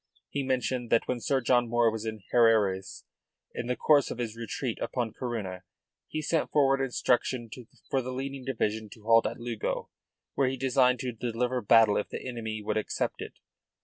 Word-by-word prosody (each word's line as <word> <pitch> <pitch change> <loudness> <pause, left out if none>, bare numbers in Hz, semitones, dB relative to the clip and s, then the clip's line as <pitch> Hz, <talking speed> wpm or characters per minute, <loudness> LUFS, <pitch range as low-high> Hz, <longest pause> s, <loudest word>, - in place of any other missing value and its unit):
He 140 - -1
mentioned 130 -2 -1
that 115 - +3
when 125 -1 -1
Sir 135 +3 +1
John 120 -1 +2
Moore 120 -1 +3
was 110 0 -4
at 110 - -2 0.2
Herrerias, 110 -5 +3 0.5
in 120 - -4
the 125 - 0
course 145 0 +4
of - - -5
his 115 -3 -3
retreat 115 +1 -4
upon 120 -4 -2
Corunna, 105 -8 -4 0.5
he 155 0 -4
sent 160 +1 0
forward 135 -2 +3
instructions 125 -2 0 0.4
for 135 - +2
the 130 +1 -5
leading 135 +1 -5
division 110 -4 -2
to 110 - -17
halt 115 0 +5
at 115 - -5
Lugo, 120 -2 -3 0.4
where 135 - +2
he 130 - -3
designed 130 -1 +3
to 130 -2 -2
deliver 120 +2 -2
battle 110 -1 +5
if 105 - -2
the - - -6
enemy 110 -3 -4
would 105 - -1
accept 110 - -2
it. - - -7
120 Hz, 180 wpm, -29 LUFS, 110-130 Hz, 0.5 s, halt